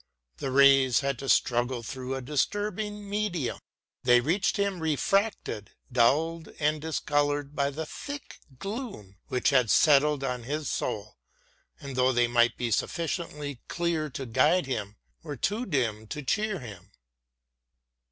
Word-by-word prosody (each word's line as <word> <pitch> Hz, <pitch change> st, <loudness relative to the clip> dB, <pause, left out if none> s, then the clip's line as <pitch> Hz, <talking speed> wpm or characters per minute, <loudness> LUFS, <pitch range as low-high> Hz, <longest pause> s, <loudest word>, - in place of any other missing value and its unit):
The 135 Hz, -, -3 dB
rays 135 Hz, -2 st, +5 dB
had 140 Hz, -3 st, -1 dB
to 135 Hz, -, -5 dB
struggle 120 Hz, 0 st, +2 dB
through 130 Hz, +3 st, -4 dB
a 135 Hz, -, -5 dB
disturbing 205 Hz, -, -2 dB
medium: 200 Hz, -, -2 dB, 0.4 s
they 125 Hz, -1 st, +5 dB
reached 170 Hz, -, +1 dB
him 200 Hz, -2 st, 0 dB
refracted, 160 Hz, -, 0 dB, 0.2 s
dulled 155 Hz, +7 st, +2 dB
and 150 Hz, 0 st, +1 dB
discoloured 145 Hz, -2 st, 0 dB
by 140 Hz, 0 st, +1 dB
the 155 Hz, +3 st, -5 dB
thick 285 Hz, -, -8 dB, 0.2 s
gloom 195 Hz, -, -6 dB
which 125 Hz, +3 st, +1 dB
had 125 Hz, -5 st, +3 dB
settled 145 Hz, +2 st, +4 dB
on 125 Hz, -2 st, -2 dB
his 145 Hz, +5 st, -3 dB
soul; -, -, -3 dB, 0.6 s
and 140 Hz, -4 st, -7 dB
though 130 Hz, +1 st, +3 dB
they 120 Hz, -1 st, +3 dB
might 120 Hz, 0 st, +3 dB
be 120 Hz, -1 st, -2 dB
sufficiently 150 Hz, -, -2 dB
clear 170 Hz, -3 st, -1 dB
to 135 Hz, 0 st, -6 dB
guide 130 Hz, +9 st, +3 dB
him, 110 Hz, -6 st, -4 dB, 0.3 s
were 145 Hz, -3 st, -6 dB
too 215 Hz, -, -1 dB
dim 115 Hz, -, -1 dB
to 150 Hz, +5 st, -5 dB
cheer 210 Hz, +7 st, 0 dB
him. 105 Hz, -, -10 dB
140 Hz, 140 wpm, -28 LUFS, 125-170 Hz, 0.6 s, rays